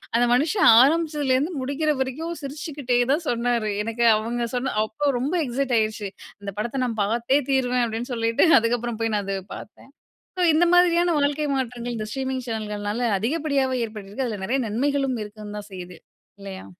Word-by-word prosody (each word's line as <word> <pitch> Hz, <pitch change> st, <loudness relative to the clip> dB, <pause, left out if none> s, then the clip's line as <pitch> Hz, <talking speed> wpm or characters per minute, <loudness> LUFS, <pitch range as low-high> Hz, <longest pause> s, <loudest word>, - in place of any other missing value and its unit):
அந்த 240 Hz, +1 st, +4 dB
மனுஷன் 315 Hz, -, +3 dB, 0.2 s
ஆரம்பிச்சதிலேருந்து 300 Hz, -1 st, +1 dB
முடிக்கிற 285 Hz, +4 st, 0 dB
வரைக்கும், 310 Hz, +6 st, -3 dB
சிரிச்சுக்குட்டே 275 Hz, -3 st, -2 dB
தான் 325 Hz, +3 st, -2 dB
சொன்னரு. 235 Hz, -2 st, 0 dB
எனக்கு 230 Hz, +1 st, -1 dB
அவங்க 235 Hz, +2 st, -2 dB
சொன்ன 255 Hz, +2 st, -1 dB
அப்போ 280 Hz, +6 st, -1 dB
ரொம்ப 280 Hz, +8 st, -2 dB
எக்ஸைட் 255 Hz, 0 st, -1 dB
ஆகிருச்சு. 215 Hz, -2 st, -2 dB, 0.3 s
"இந்த 200 Hz, -1 st, -5 dB
படத்த 245 Hz, +4 st, -2 dB
நான் 225 Hz, -3 st, -3 dB
பாத்தே 235 Hz, +6 st, +1 dB
தீருவேன்" 250 Hz, -2 st, +2 dB
அப்படீன்னு 230 Hz, +3 st, -4 dB
சொல்லிட்டு, 230 Hz, +6 st, +2 dB
அதுக்கப்பறம் 235 Hz, 0 st, -2 dB
போய் 225 Hz, -1 st, 0 dB
நான் 205 Hz, -1 st, -1 dB
அத 195 Hz, 0 st, -1 dB, 0.2 s
பாத்தேன். 220 Hz, -, -14 dB, 0.5 s
சோ -, -, +3 dB
இந்த 325 Hz, +3 st, +4 dB
மாதிரியான 350 Hz, -1 st, +4 dB
வாழ்க்கை 290 Hz, +1 st, 0 dB
மாற்றங்கள், 245 Hz, -2 st, -3 dB
இந்த 215 Hz, -, -4 dB
ஸ்ட்ரீமிங் 265 Hz, +1 st, -3 dB
சேனல்கள்னால 215 Hz, +1 st, -2 dB
அதிகப்படியாவே 270 Hz, +2 st, 0 dB
ஏற்பட்டிருக்கு. 215 Hz, +3 st, -6 dB
அதுல 215 Hz, -3 st, -4 dB
நெறைய 265 Hz, +5 st, 0 dB
நன்மைகளும் 270 Hz, +3 st, 0 dB
இருக்கவும் 210 Hz, 0 st, -9 dB
தான் 205 Hz, -, -11 dB
செய்யுது. 180 Hz, -2 st, -9 dB, 0.4 s
இல்லையா? 195 Hz, -1 st, -8 dB
245 Hz, 155 wpm, -24 LUFS, 220-280 Hz, 0.5 s, அந்த